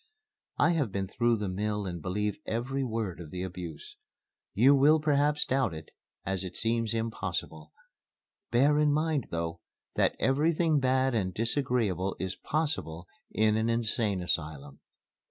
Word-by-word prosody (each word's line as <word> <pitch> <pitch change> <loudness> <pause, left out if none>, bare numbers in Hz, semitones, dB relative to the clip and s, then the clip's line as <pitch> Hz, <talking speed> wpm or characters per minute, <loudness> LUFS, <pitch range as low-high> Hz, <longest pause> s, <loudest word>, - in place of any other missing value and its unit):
I - - +4
have 145 - 0
been 95 0 -2
through 120 +4 +2
the 105 -1 -3
mill 105 +2 -2
and 85 -3 -5
believe 105 +4 -2
every 130 +4 -1
word 110 -7 -3
of 85 -3 -8
the 90 +3 -4
abuse. 90 -4 -7 0.6
You 130 +7 +6
will 145 +3 +5
perhaps 150 0 +2
doubt 130 -10 0
it, 80 0 -10 0.3
as 95 0 -2
it 90 -1 -7
seems 115 -1 0
impossible. 95 -8 -4 0.8
Bear 140 +5 +4
in 150 -1 +4
mind, 155 -3 0
though, 85 0 -3 0.3
that - - +2
everything 155 +3 +2
bad 130 0 +2
and 95 -5 0
disagreeable 115 - 0
is 95 0 -3
possible 120 - -2 0.2
in 110 0 +2
an 110 +1 +1
Insane 110 -4 0
Asylum." 75 -5 -3
110 Hz, 145 wpm, -29 LUFS, 90-135 Hz, 0.8 s, You